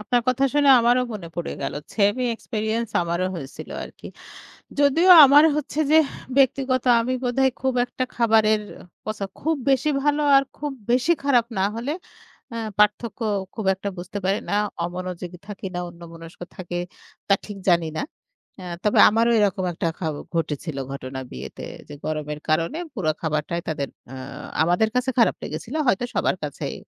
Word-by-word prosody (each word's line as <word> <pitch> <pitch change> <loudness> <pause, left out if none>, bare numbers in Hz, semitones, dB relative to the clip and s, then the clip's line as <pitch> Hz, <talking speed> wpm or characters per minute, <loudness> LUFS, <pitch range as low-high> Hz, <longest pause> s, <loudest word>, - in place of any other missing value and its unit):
আপনার 240 +3 +1
কথা 255 +2 +2
শুনে 290 -1 +4
আমারও 240 +2 +3
মনে 185 -5 -7
পড়ে 175 - -3
গেল। 135 - -3 0.2
সেমই 210 +4 +2
এক্সপেরিয়েন্স 220 +1 -3
আমারও 170 +2 -1
হয়েছিল 140 -6 -8
আরকি। - - -12 0.7
যদিও 295 +6 +4 0.2
আমার 285 +3 +7
হচ্ছে 300 0 -3
যে 315 - +7 0.4
ব্যক্তিগত 265 -1 +2 0.2
আমি 255 +2 -1
বোধহয় 260 +1 +2
খুব 265 0 +1
একটা 250 +1 -3
খাবারের 220 -2 +3 0.4
কথা 215 -2 -4 0.2
খুব 320 +2 0
বেশি 270 +3 +3
ভালো 295 0 +2
আর 275 - +6
খুব 295 0 -3 0.2
বেশি 250 +7 +3
খারাপ 250 -5 +3
না - - +2
হলে 245 +6 -2 0.6
আ - - -3 0.2
পার্থক্য 210 +3 +2 0.3
খুব 220 - -5
একটা 195 +1 -5
বুঝতে 175 +3 -6
পারি 195 +2 +1
না - - -1 0.3
অমনোযোগী 180 0 -6
থাকি 200 -2 -6
না - - -1
অন্যমনস্ক 165 -1 -12 0.2
থাকে 175 -1 -5 0.5
তা 200 - +5
ঠিক 205 -2 -8
জানি 170 -2 +3
না। - - -1 0.6
এ - - -9 0.2
তবে 210 - +3
আমারও 230 +2 +2
এরকম 195 -2 +1
একটা 165 - -2
খ - - -25 0.4
ঘটেছিল 155 -2 -2
ঘটনা 130 -1 -6
বিয়েতে 65 - -8 0.3
যে - - -8
গরমের 150 -1 -3
কারণে 165 - +1 0.2
পুরো 190 - -1
খাবারটাই 155 +2 -2
তাদের 145 -3 -3 0.2
আ - - -7 0.5
আমাদের 175 +6 +2
কাছে 250 +1 +1
খারাপ 230 - +4
লেগেছিল। 250 - -6
হয়তো 245 0 +2
সবার - - +1
কাছেই - - -4
210 Hz, 160 wpm, -23 LUFS, 170-255 Hz, 0.7 s, আমার